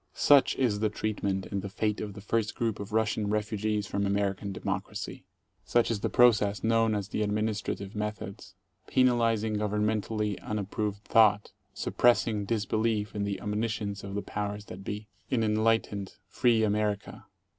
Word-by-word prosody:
Such 145 -2 +5
is 115 -6 +1
the 110 0 +2
treatment 100 -3 -2
and 100 -1 -1
the 100 - -5
fate 105 +1 -1
of 105 -1 -5
the 100 - -10
first 110 +1 -1
group 115 -3 -1
of 100 0 -6
Russian 110 -1 +1
refugees 105 0 -1
from 100 0 -2
American 100 0 0
"democracy." 95 - -4 0.4
Such 115 +7 +2
is 110 - -1
the - - -1
process 105 -5 +4
known 115 -1 +3
as 100 -1 -3
the - - -2
ad&iinistrative 105 -1 -2
methods, 105 -2 -5 0.3
penalizing 115 -4 +2
governmentally 105 0 -1
unap 110 -3 -4
18 - - -4
proved 105 +1 -3
Thought, 105 -2 +4 0.2
suppressing 115 -3 +2
disbelief 110 -1 0
in 100 0 -2
the 100 -1 -2
omniscence 105 -1 -2
of 100 0 -6
the 100 - -2
powers 105 0 -4
that 95 0 -9
be* 105 +2 -5 0.2
In 115 -3 +1
enlightened, 110 -2 +1
free 115 +2 +2
America. 105 -1 -1
105 Hz, 155 wpm, -29 LUFS, 100-110 Hz, 0.4 s, Such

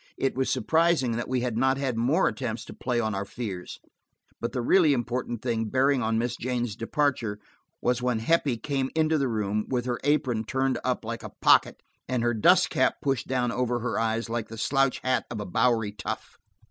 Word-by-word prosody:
It 135 - 0
was 130 0 -1
surprising 160 -6 +2
that 115 +1 -2
we 130 -1 0
had 120 -2 -2
not 130 +1 +3
had 135 -3 -1
more 130 +10 +2
attempts 120 -3 -3
to - - -9
play 125 -2 -1
on 110 -2 -1
our 100 0 -2
fears. 100 -4 -6 0.6
But 115 - -3
the 125 -3 -2
really 160 +1 +5
important 120 -2 -3
thing 115 -3 0
bearing 130 +3 +2
on 110 0 0
Miss 120 +1 -1
Jane's 120 -3 -2
departure 115 -3 -1 0.5
was 125 0 +1
when 125 -2 +1
Heppie 135 +1 +1
came 135 +1 -2
into 160 -1 +2
the 135 - +1
room, 105 -2 -1
with 125 -2 -1
her 120 -2 -2
apron 130 -6 +1
turned 130 +1 0
up 125 -3 -1
like 115 +1 -4
a - - -7
pocket - - +4 0.2
and 125 -2 -1
her 120 0 +2
dust 110 - +4
cap - - +2
pushed 135 -3 0
down 125 -2 0
over 120 0 0
her 125 - -1
eyes 115 +1 0
like 115 -1 -3
the 115 - -8
slouch 135 +3 +1
hat 130 0 0
of 120 - -5
a 105 - -4
bowery 115 +2 +1
tough. 100 -2 -6
120 Hz, 205 wpm, -27 LUFS, 115-130 Hz, 0.6 s, really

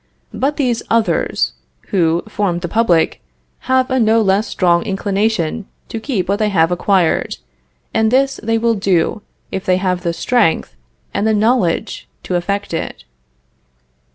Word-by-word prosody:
But 285 +3 -1
these 245 -5 0
others, 230 -1 +1 0.4
who 170 -4 +1
form 200 -5 -1
the 175 - -3
public, 180 -5 +2 0.5
have 260 0 +2
a 260 - +2
no 225 0 +4
less 205 0 +2
strong 175 -2 +2
inclination 200 0 -1 0.2
to 225 - -4
keep 220 -6 -2
what 200 +2 0
they 215 -1 +2
have 165 -4 +2
acquired; 180 -1 +1 0.6
and 220 0 +2
this 270 +3 +2
they 225 +1 0
will 230 0 +2
do, 195 0 0 0.3
if 190 - -3
they 185 -1 +2
have 185 -1 -1
the 170 -2 -1
strength 205 - +1 0.4
and 215 - 0
the 220 - +3
knowledge 215 -5 0 0.2
to - - -4
effect 200 +2 -2
it. 160 - -4
205 Hz, 150 wpm, -17 LUFS, 180-225 Hz, 0.6 s, no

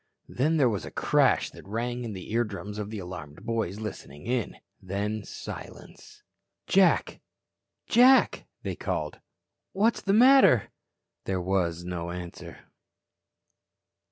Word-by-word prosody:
Then 155 +6 +1
there 140 -4 +4
was 105 -7 -1
a - - -7
crash - - +2
that - - -14
rang 120 +4 -3
in 115 -3 -5
the 95 +1 -8
eardrums 105 -3 -2
of 105 -1 -4
the 110 - -6
alarmed 90 -4 -8
boys 110 -4 -2
listening 75 -9 -8
in. 120 -1 -2 0.2
Then, 100 +3 -3
silence. - - -10 0.4
"Jack. 190 -2 +3 0.6
Jack," 255 +3 +5 0.2
they - - -3
called. - - -3 0.5
"What's 215 +4 +2
the 195 - +1
matter?" 250 - +6 0.5
There 95 -1 -1
was 90 -2 -1
no 85 -1 -4
answer. 90 0 -8
105 Hz, 125 wpm, -27 LUFS, 90-125 Hz, 0.6 s, matter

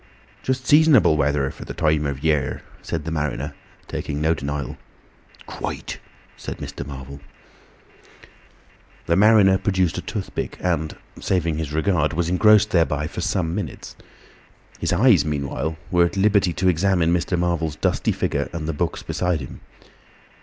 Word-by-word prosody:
"Just 130 0 -2
seasonable 150 - +6
weather 70 -2 +1
for - - -10
the - - -8
time 75 -2 +1
of 70 -1 -5
year," 75 -3 0 0.2
said 80 -3 -4
the 80 - -3
mariner, 75 -2 -2 0.3
taking 75 - -4
no 80 +2 +2
denial. 75 -1 -4 0.7
"Quite," - - -5 0.4
said - - -7
Mr. - - -6
Marvel. 70 0 -9 1.9
The 85 - +2
mariner 100 -2 +5
produced 95 -4 0
a - - -5
toothpick, - - -5
and 80 -4 -1 0.2
(saving 85 -4 0
his 80 -3 -4
regard) 80 0 +1
was 85 +1 0
engrossed 105 +3 +5
thereby 75 -4 +2
for 85 +3 -5
some 85 -2 -1
minutes. 105 +2 -5 0.8
His - - -1
eyes 95 - +5
meanwhile 75 +1 -3
were 90 -1 +4
at 85 - -4
liberty 100 -2 +3
to 95 +2 0
examine 90 -1 +2
Mr. 90 +1 0
Marvel's 85 -3 -1
dusty - - 0
figure, - - -1
and 80 -2 -5
the 80 - -1
books 75 - -2
beside 90 -3 -1
him. 65 - -9
85 Hz, 145 wpm, -22 LUFS, 75-95 Hz, 1.9 s, seasonable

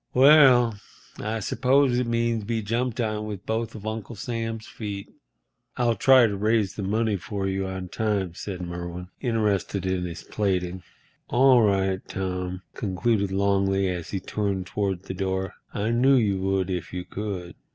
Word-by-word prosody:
"Well, 130 -5 +7 0.4
I 110 +1 -2
suppose 130 +3 +2
it 125 - -1
means 115 -1 0
be 115 0 -1
jumped 120 +3 -1
on 110 -2 -1
with 100 -2 -6
both 115 0 -2
of 110 -1 -9
Uncle 110 +1 -4
Sam's 115 0 -4
feet." 100 -3 -7 0.6
"I'll 120 -1 +3
try 130 +3 +6
to 105 -3 -1
raise 105 -1 +1
the - - -5
money 105 +2 0
for 95 +2 -4
you 95 0 -1
on 95 -1 -5
time," 100 -5 -1
said 90 0 -6
Merwin, 90 0 -6
interested 105 -6 0
in 95 -1 0
his 85 -2 -6
plaiting. 95 -3 -1 0.5
"All 130 0 +5
right, 95 -2 +2
Tom," 90 -1 -3
concluded 100 0 0
Longley, 95 0 +2
as 90 -2 -4
he 95 - -2
turned 100 -1 -2
toward 95 -2 -2
the 95 - -6
door; 95 0 -2 0.2
"I 105 +3 -1
knew 130 +4 +4
you 105 -6 +2
would 95 -1 0
if 90 -2 -4
you 90 -1 -5
could." 95 -4 -5
100 Hz, 160 wpm, -25 LUFS, 95-115 Hz, 0.6 s, Well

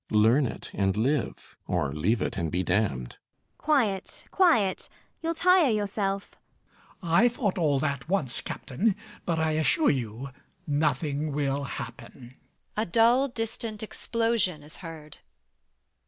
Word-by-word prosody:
Learn 115 +6 +4
it 110 - -8
and 95 0 +1
live; 130 +4 -1
or 80 -6 0
leave 95 +10 +1
it - - -2
and 85 -5 -2
be 90 +1 0
damned. 90 - 0
ELLIE. - - -46
Quiet, 240 -11 0
quiet: 270 - +3 0.3
you'll 330 +1 -1
tire 360 -3 +5
yourself. 200 -2 -1 0.7
MAZZINI. 165 -1 -2
I 245 - +6
thought 210 -6 -1
all 150 -4 +3
that 140 -1 -2
once, 160 -10 0
Captain; 190 - -1 0.3
but 170 -2 +1
I 160 0 +1
assure 160 - +3
you 125 0 -4 0.4
nothing 150 0 0
will 140 -1 -1
happen. 120 +1 -8 0.4
A 215 - +1
dull 235 +7 +4
distant 225 -3 -4
explosion 220 -8 0
is 150 +2 -9
heard. 160 -4 -10
155 Hz, 135 wpm, -27 LUFS, -, 0.7 s, I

